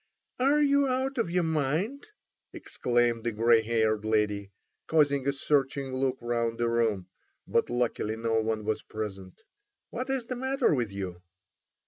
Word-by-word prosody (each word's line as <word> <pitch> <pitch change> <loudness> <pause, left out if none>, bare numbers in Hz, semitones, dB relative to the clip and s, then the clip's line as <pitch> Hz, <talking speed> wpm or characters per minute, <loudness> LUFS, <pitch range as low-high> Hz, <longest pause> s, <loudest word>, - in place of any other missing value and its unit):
"Are 285 +4 +4
you 280 -1 +3
out 260 +1 -1
of 225 - 0
your 180 0 +1
mind?" 160 - -1 0.5
exclaimed 120 -2 0
the 120 - 0
grey 115 +1 +4
haired 110 -1 +1
lady, 105 -2 0 0.4
casting 140 -4 +2
a - - +4
searching 135 -1 0
look 130 0 0
round 115 -1 -1
the 120 - 0
room; 115 -5 +1 0.4
but - - +1
luckily 120 -3 -1
no 115 0 0
one 110 -1 -2
was 110 0 -1
present. 95 -4 -7 0.5
"What 255 +3 -4
is 265 -3 0
the 255 - -4
matter 265 - +1
with 120 -7 -1
you?" 95 -3 -6
120 Hz, 150 wpm, -28 LUFS, 110-170 Hz, 0.5 s, Are